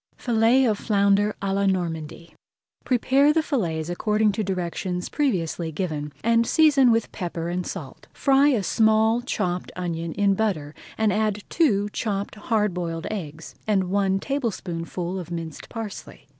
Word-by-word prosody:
FILLETS 240 Hz, +2 st, +3 dB
OF 215 Hz, -2 st, 0 dB
FLOUNDER 200 Hz, 0 st, +2 dB
À 195 Hz, -1 st, 0 dB
LA 200 Hz, 0 st, +1 dB
NORMANDY 170 Hz, -3 st, -3 dB, 0.5 s
Prepare 270 Hz, +3 st, +3 dB
the 320 Hz, +1 st, +2 dB
fillets 165 Hz, -, -1 dB
according 210 Hz, +4 st, +1 dB
to 215 Hz, +2 st, -2 dB
directions 180 Hz, -1 st, -3 dB
previously 175 Hz, -, -1 dB
given, 150 Hz, -3 st, -3 dB
and 230 Hz, 0 st, +3 dB
season 290 Hz, -5 st, +5 dB
with 230 Hz, 0 st, +1 dB
pepper 170 Hz, -3 st, -4 dB
and 180 Hz, 0 st, -2 dB
salt. 155 Hz, -9 st, -8 dB
Fry 275 Hz, 0 st, +3 dB
a 245 Hz, -9 st, +2 dB
small 220 Hz, +3 st, +3 dB
chopped 180 Hz, -7 st, -2 dB
onion 170 Hz, -2 st, -3 dB
in 200 Hz, 0 st, +2 dB
butter 185 Hz, -9 st, -1 dB, 0.2 s
and 220 Hz, -3 st, +2 dB
add 210 Hz, -1 st, 0 dB
two 210 Hz, -, +2 dB
chopped 200 Hz, -2 st, -2 dB
hard 210 Hz, -2 st, 0 dB
boiled 165 Hz, -2 st, -4 dB
eggs, 165 Hz, -6 st, -6 dB
and 190 Hz, -4 st, +1 dB
one 195 Hz, -1 st, +2 dB
tablespoonful 185 Hz, -8 st, -3 dB
of 175 Hz, -2 st, -8 dB
minced 165 Hz, -3 st, -6 dB
parsley. 225 Hz, -4 st, -8 dB
200 Hz, 145 wpm, -24 LUFS, 175-225 Hz, 0.5 s, season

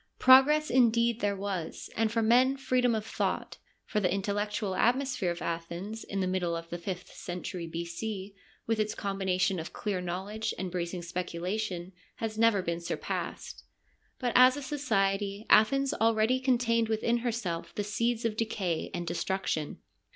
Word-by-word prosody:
Progress 290 Hz, +4 st, +6 dB
indeed 235 Hz, -2 st, +3 dB
there 205 Hz, -2 st, 0 dB
was, 190 Hz, -4 st, -4 dB
and 220 Hz, -1 st, +1 dB
for 230 Hz, -1 st, +1 dB
men 255 Hz, +4 st, +4 dB
freedom 250 Hz, -3 st, +2 dB
of 215 Hz, -1 st, -3 dB
thought, -, -, -2 dB, 0.3 s
for 210 Hz, -, -1 dB
the 185 Hz, -3 st, +1 dB
intel 200 Hz, +1 st, -1 dB
lectual 205 Hz, -1 st, -2 dB
atmosphere 250 Hz, -3 st, +1 dB
of 175 Hz, 0 st, -4 dB
Athens 170 Hz, +6 st, -4 dB
in 195 Hz, -1 st, -3 dB
the 185 Hz, -, 0 dB
middle 180 Hz, -2 st, 0 dB
of 165 Hz, 0 st, -6 dB
the 175 Hz, -, -4 dB
fifth 180 Hz, 0 st, -5 dB
century 175 Hz, -1 st, -5 dB
B.C., 185 Hz, +5 st, -5 dB, 0.3 s
with 225 Hz, -1 st, 0 dB
its 215 Hz, 0 st, 0 dB
combination 190 Hz, -2 st, 0 dB
of 160 Hz, -, -7 dB
clear 200 Hz, -4 st, -2 dB
knowledge 200 Hz, +5 st, -3 dB
and 185 Hz, -1 st, -4 dB
bracing 175 Hz, 0 st, -3 dB
speculation, 180 Hz, +1 st, -3 dB, 0.2 s
has 220 Hz, -1 st, -4 dB
never 220 Hz, -3 st, +3 dB
been 170 Hz, -1 st, -2 dB
surpassed. 170 Hz, -, -4 dB, 0.5 s
But 245 Hz, -2 st, -1 dB
as 255 Hz, +2 st, +7 dB
a 290 Hz, -, -5 dB
society, 205 Hz, -7 st, 0 dB
Athens 275 Hz, +5 st, +5 dB
already 225 Hz, +3 st, +2 dB
contained 235 Hz, -3 st, +2 dB
within 225 Hz, +2 st, +1 dB
herself 225 Hz, -8 st, -3 dB
the 205 Hz, -, -1 dB
seeds 230 Hz, +3 st, -1 dB
of 220 Hz, -2 st, 0 dB
decay 195 Hz, -7 st, -2 dB
and 175 Hz, -, -3 dB
destruction. 180 Hz, -2 st, -2 dB
205 Hz, 160 wpm, -30 LUFS, 180-230 Hz, 0.5 s, as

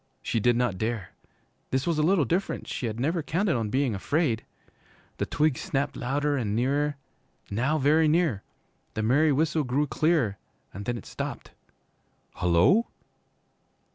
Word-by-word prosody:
She 115 Hz, -, 0 dB
did 120 Hz, +2 st, +3 dB
not 120 Hz, -6 st, 0 dB
dare. 110 Hz, -3 st, -2 dB, 0.6 s
This 130 Hz, +1 st, 0 dB
was 165 Hz, -3 st, 0 dB
a -, -, +4 dB
little 165 Hz, -1 st, +3 dB
different, 180 Hz, -, -2 dB
she 120 Hz, -, -3 dB
had 110 Hz, +1 st, -4 dB
never 160 Hz, +6 st, 0 dB
counted 170 Hz, +4 st, 0 dB
on 115 Hz, -3 st, -1 dB
being 130 Hz, +1 st, +1 dB
afraid. 120 Hz, -, 0 dB, 0.7 s
The -, -, -2 dB
twigs 150 Hz, -3 st, +1 dB
snapped 140 Hz, +1 st, -1 dB
louder 145 Hz, +3 st, 0 dB
and 105 Hz, -5 st, -1 dB
nearer 140 Hz, +4 st, +1 dB, 0.5 s
now 130 Hz, +9 st, +1 dB
very 155 Hz, +3 st, +4 dB
near. 155 Hz, -, +2 dB, 0.5 s
The 110 Hz, -, -1 dB
merry 145 Hz, +7 st, +4 dB
whistle 155 Hz, +2 st, +1 dB
grew 135 Hz, +3 st, +1 dB
clearer, 150 Hz, -9 st, +1 dB, 0.3 s
and 100 Hz, +2 st, -7 dB
then 120 Hz, +1 st, -1 dB
it 110 Hz, -, -10 dB
stopped. -, -, -6 dB, 0.9 s
'Hullo!' 90 Hz, -, +4 dB
135 Hz, 150 wpm, -27 LUFS, 115-155 Hz, 0.9 s, a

